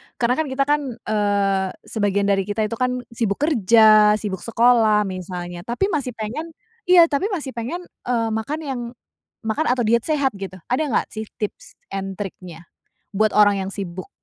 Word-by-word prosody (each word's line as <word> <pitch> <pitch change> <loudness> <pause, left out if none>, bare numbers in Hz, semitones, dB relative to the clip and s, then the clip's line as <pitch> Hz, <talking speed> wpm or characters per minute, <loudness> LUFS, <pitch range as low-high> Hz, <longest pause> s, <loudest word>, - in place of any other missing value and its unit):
karena 250 +4 +1
kan 315 - 0
kita 265 +1 0
kan 295 +1 +1
eee, 200 -3 0
sebagian 205 -2 0
dari 200 -1 +1
kita 215 +1 -1
itu 220 +2 -3
kan 250 0 0
sibuk 225 -4 -1
kerja, 215 - +6
sibuk 205 -4 -4
sekolah 230 -2 +3
misalnya, 180 -2 -6
tapi 315 +13 0
masih 270 -7 -2
pengen 225 +10 -4 0.4
iya 360 -1 +8
tapi 330 +9 +1
masih 295 -6 -5
pengen 250 +10 -5 0.2
eee, 230 -2 +1
makan 220 +8 -2
yang 265 -4 -4 0.6
makan 220 +8 -1
atau 250 0 +2
diet 230 +1 +2
sehat 285 -4 +1
gitu. 195 -1 -6 0.2
Ada 295 +5 +1
enggak 250 - 0
sih 220 0 -6
tips 210 - -6 0.2
and 195 0 -4
triknya? 180 -4 -8 0.5
Buat 215 +1 +3
orang 205 -1 +5
yang 190 - -5
sibuk. 185 -3 -6
220 Hz, 170 wpm, -22 LUFS, 200-250 Hz, 0.6 s, iya